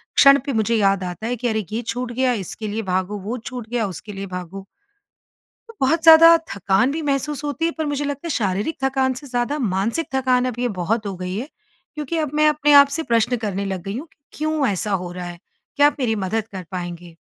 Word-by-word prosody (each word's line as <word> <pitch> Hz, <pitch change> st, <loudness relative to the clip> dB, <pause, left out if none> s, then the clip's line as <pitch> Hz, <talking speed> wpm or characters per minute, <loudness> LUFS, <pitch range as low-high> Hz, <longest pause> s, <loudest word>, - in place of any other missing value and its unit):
क्षण 275 Hz, 0 st, +7 dB
पे 275 Hz, -, -2 dB
मुझे 225 Hz, +1 st, +1 dB
याद 195 Hz, -3 st, +2 dB
आता 180 Hz, +5 st, -5 dB
है, 245 Hz, -, -1 dB
कि 245 Hz, +1 st, -3 dB
अरे! 220 Hz, -3 st, -1 dB
ये 225 Hz, +2 st, -2 dB
छूट 245 Hz, +1 st, -4 dB
गया, 255 Hz, 0 st, +1 dB
इसके 215 Hz, +1 st, -5 dB
लिए 220 Hz, +2 st, -2 dB
भागो, 185 Hz, +2 st, -1 dB
वो 220 Hz, +6 st, -4 dB
छूट 240 Hz, -1 st, -8 dB
गया, 235 Hz, -4 st, 0 dB
उसके 200 Hz, +3 st, -8 dB
लिए 195 Hz, 0 st, -5 dB
भागो। 185 Hz, +1 st, -7 dB, 1.0 s
तो 460 Hz, -, -12 dB
बहुत 320 Hz, +5 st, +2 dB
ज़्यादा 330 Hz, 0 st, +9 dB, 0.2 s
थकान 200 Hz, +6 st, +2 dB
भी 320 Hz, +1 st, -3 dB
महसूस 285 Hz, +1 st, -1 dB
होती 290 Hz, +3 st, -2 dB
है। 335 Hz, -, +2 dB
पर 315 Hz, -, -1 dB
मुझे 290 Hz, 0 st, -2 dB
लगता 285 Hz, +3 st, -4 dB
है -, -, -3 dB
शारीरिक 205 Hz, -, -1 dB
थकान 265 Hz, -1 st, +1 dB
से 285 Hz, +3 st, -9 dB
ज़्यादा, 245 Hz, +4 st, -1 dB
मानसिक 225 Hz, -, -1 dB
थकान 255 Hz, -1 st, +2 dB
अब 235 Hz, -, -13 dB
ये 245 Hz, 0 st, 0 dB
बहुत 215 Hz, +4 st, -1 dB
हो 195 Hz, -, -3 dB
गई 185 Hz, +1 st, -4 dB
है। 255 Hz, +7 st, -4 dB, 0.5 s
क्योंकि 300 Hz, +2 st, -4 dB
अब 305 Hz, -3 st, -1 dB
मैं 305 Hz, 0 st, +4 dB
अपने 295 Hz, -1 st, +2 dB
आप 280 Hz, 0 st, +9 dB
से 325 Hz, -, -2 dB
प्रश्न 235 Hz, -1 st, +1 dB
करने 200 Hz, -3 st, -3 dB
लग 190 Hz, -3 st, -4 dB
गई 195 Hz, +3 st, -5 dB
हूँ, 315 Hz, -, -7 dB
कि -, -, -31 dB, 0.2 s
क्यों 310 Hz, -2 st, 0 dB
ऐसा 205 Hz, +1 st, -1 dB
हो 175 Hz, -, -6 dB
रहा 180 Hz, 0 st, -6 dB
है? 175 Hz, -1 st, -8 dB, 0.4 s
क्या 290 Hz, 0 st, +6 dB
आप 295 Hz, -, +1 dB
मेरी 225 Hz, -3 st, +1 dB
मदद 220 Hz, +2 st, -1 dB
कर 185 Hz, -2 st, -6 dB
पाएँगे? 175 Hz, -2 st, -6 dB
235 Hz, 230 wpm, -21 LUFS, 195-285 Hz, 1.0 s, ज़्यादा